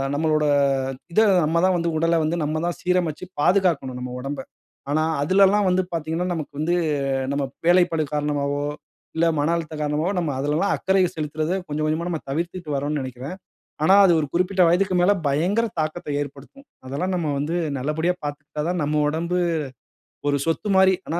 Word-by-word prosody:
நம்மளோட 155 0 +1 0.7
இத 220 - +5 0.2
நம்ம 165 +2 0
தான் 185 - +2
வந்து 170 0 -1
உடலை 165 0 +2
வந்து, 160 +3 0
நம்ம 155 +1 -1
தான் 175 - -3
சீரமைச்சு 180 -2 0 0.2
பாதுகாக்கணும் 160 -9 +2
நம்ம 125 0 -5
உடம்பை. 135 0 -5 0.5
ஆனா 155 +2 +2 0.2
அதுலலாம் 195 +5 +4
வந்து 185 +1 +3
பார்த்தீங்கன்னா, 165 +2 -2
நமக்கு 155 -3 -5
வந்து 170 +3 +1 0.6
நம்ம 140 0 -1 0.2
வேலைப்பளு 175 -2 +4
காரணமாவோ, 145 -1 -1 0.5
இல்ல 170 - +3
மன 150 +3 +1
அழுத்தம் 160 -2 -5
காரணமாவோ, 150 +4 0
நம்ம 160 -4 -1
அதுலலாம் 150 +8 +1
அக்கறைய 190 -1 +2
செலுத்துறத 155 +2 -2
கொஞ்சம் 155 +1 -2
கொஞ்சமா 160 +3 -1
நம்ம 165 -3 -2
தவிர்த்துட்டு 170 +1 -3
வறோம்ன்னு 145 +1 -1
நெனைக்கிறேன். 130 +6 -6 0.5
ஆனா, 190 - +6
அது 180 - +6
ஒரு 150 - -1
குறிப்பிட்ட 185 +1 +2
வயதுக்கு 185 +2 +2
மேல 180 +3 +4 0.2
பயங்கர 180 +11 +1
தாக்கத்த 155 +1 -3
ஏற்படுத்தும். 145 - -9 0.2
அதெல்லாம் 180 +8 -2
நம்ம 165 -3 -1
வந்து 155 +5 -1 0.2
நல்லபடியா 155 +6 0
பார்த்துக்கிட்டா 145 +1 -5
தான் 180 -1 -1
நம்ம 150 +1 +1
உடம்பு 170 +3 -1 0.9
ஒரு 145 - +2
சொத்து 165 +6 -1
மாரி. 190 0 +5
ஆனா 170 +2 -1
160 Hz, 160 wpm, -23 LUFS, 150-180 Hz, 0.9 s, ஆனா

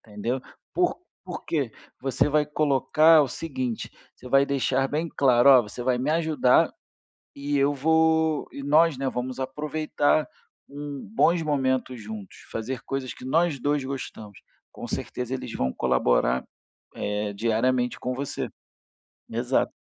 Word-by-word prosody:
Entendeu? 115 +4 -4 0.3
Por 355 -1 +2 0.3
por - - -6
quê? 140 -8 -1 0.3
Você 135 +1 +1
vai 150 0 +3
colocar 155 +2 +4
o 140 - -1
seguinte: 130 -5 -4 0.2
você 125 - -12
vai 135 +2 +5
deixar 135 -1 +1
bem 155 +4 -1
claro, 130 -4 +4
"Ó, 130 -3 +8
você 105 +4 -7
vai 125 0 +1
me 130 +4 0
ajudar, 155 -5 +3 0.6
e 145 +1 -2
eu 140 +1 +3
vou 160 +1 +2
e 140 - -7
nós, 150 +1 +4
né, 135 0 -1
vamos 130 +1 -4
aproveitar 150 +2 0 0.4
um 145 -1 -7
bons 175 -5 +3
momentos 130 -4 0
juntos, 105 -2 -8 0.2
fazer 125 +4 -4
coisas 135 -2 -4
que - - -12
nós 160 +2 +1
dois 145 +2 +1
gostamos". 120 -6 -7 0.3
Com - - -8
certeza, 125 0 -4
eles 130 - -5
vão 65 0 -1
colaborar, 65 0 +1 0.5
eh, 105 0 -2
diariamente 120 +4 +1
com 125 - -3
você. 140 +2 -4 0.8
Exato. - - 0
135 Hz, 140 wpm, -25 LUFS, 125-150 Hz, 0.8 s, Ó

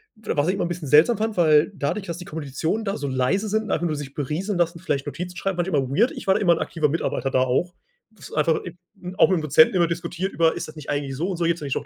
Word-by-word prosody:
W 215 -6 -4
was 145 +2 +1
ich 185 - +2
immer 195 - -1
bisschen 175 -4 -5
seltsam 160 - +5
fand, 220 -2 -2
weil 155 +2 +4
dadurch, 170 +7 -2
dass 170 0 -4
die 175 - -9
Kommilitonen 160 +6 -3
da 195 - -2
so 145 -1 -4
leise 135 +12 0
sind 220 +1 0
und 220 - -5
einfach 175 - 0
nur 155 - -2
sich 140 -2 -7
berieseln 165 +8 -3
lassen, 170 -1 0
vielleicht 140 -3 -2
Notizen 180 +4 -5
schreiben, 195 -2 -2
manchmal 175 -5 +1
weird. 215 - +2
Ich - - -9
war 190 +2 +4
immer 180 -5 +4
'n - - -2
aktiver 155 -3 0
Mitarbeiter 140 -3 -2
da - - +2
auch. 130 +8 0 0.4
Das 220 - -13
einfach 155 +1 +1
im 175 -1 -9 0.4
auch 215 - +6
mit 185 - +2
dem - - -4
Dozenten 155 +5 +5
immer 175 -2 +3
diskutiert 170 +3 -3
über: 165 -1 +2
„Ist - - -5
das 155 - -12
nicht 150 -2 -10
eigentlich 145 -2 -2
so 165 +6 -2
und 180 - -3
so, 170 - 0
jetzt 170 0 0
nenne 145 - -4
ich - - -1
noch - - -3
170 Hz, 285 wpm, -23 LUFS, 150-185 Hz, 0.4 s, auch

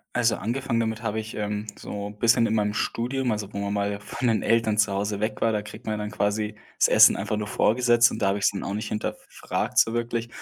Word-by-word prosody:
Also, 120 -2 +3
angefangen 115 +2 -1
damit 110 0 -3
habe 110 0 -1
ich, 110 0 -9
ähm, 105 0 -3
so 100 0 -6
bisschen 115 +3 +3
in 110 - 0
meinem 105 -1 +1
Studium, 125 +4 -1
also, 105 -1 -4
wo - - -5
man 100 0 -2
mal 100 0 -1
von 120 +4 -3
den 115 -2 +1
Eltern 115 -2 +2
zu 105 -1 +3
Hause 100 +1 -2
weg 110 0 -2
war, 115 - +2
da 105 - 0
kriegt 110 +3 -11
man 110 -1 -2
dann 105 0 -4
quasi 105 +1 -1 0.2
das - - +4
Essen - - +7
einfach 105 - -2
nur 105 -1 -3
vorgesetzt 120 +2 +3
und - - -6
da 100 - +3
habe 100 - +1
ich’s 100 - +3
dann 100 - -5
auch 100 - -3
nicht 105 +1 -4
hinterfragt 105 - -4
so 115 - +4
wirklich. 120 0 -2
110 Hz, 240 wpm, -25 LUFS, 105-115 Hz, 0.2 s, Essen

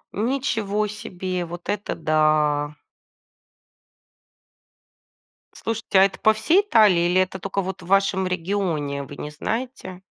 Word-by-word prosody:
Ничего 220 -3 -1
себе, 185 -4 -4
вот 175 +1 -9
это 205 0 -2
да. 155 -2 +1 2.8
Слушайте, 225 -3 -1
а 190 - +8
это 195 - -1
по 220 - +4
всей 320 - +3
Италии 210 - +4
или 185 +1 +4
это 185 0 -1
только 195 +2 -2
вот 190 0 -5
в 170 - -12
вашем 195 0 +2
регионе, 170 -6 -2
вы 145 +1 -10
не 150 - -6
знаете? 200 - -5
190 Hz, 125 wpm, -23 LUFS, 170-210 Hz, 2.8 s, а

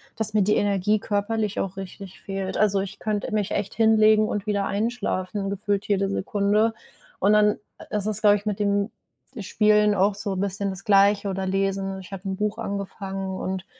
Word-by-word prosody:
dass 215 -1 -1
mir 210 -2 +3
die 210 +2 +2
Energie 205 +1 +1
körperlich 210 0 -1
auch 190 -1 -3
richtig 195 0 -9
fehlt. 195 -1 -4
Also, 200 -2 +3
ich 195 +1 -6
könnte 210 -1 -2
mich 210 -2 0
echt 200 - -2
hinlegen 215 -1 +4
und 205 -1 -3
wieder 200 -1 0
einschlafen, 200 -2 -2
gefühlt 200 0 -2
jede 195 -1 +1
Sekunde. 205 +3 +1 0.5
Und 205 +2 +4
dann 210 0 +4 0.2
i - - -7
ist 205 - -2
es, 215 0 -2
glaube 205 -1 +5
ich, 205 - -12
mit 210 -2 -1
dem 200 0 +1 0.5
Spielen 210 +1 +3
auch 200 +1 +2
so 205 -2 -3
bisschen 200 +1 -1
das 190 +1 -8
Gleiche 200 0 +4
oder 190 0 -2
lesen. 195 0 -1
Ich 190 - -13
habe 195 -1 -7
'n 190 - -3
Buch 210 +1 -1
angefangen 195 -2 -4
und 190 0 -4
200 Hz, 185 wpm, -24 LUFS, 195-210 Hz, 0.5 s, glaube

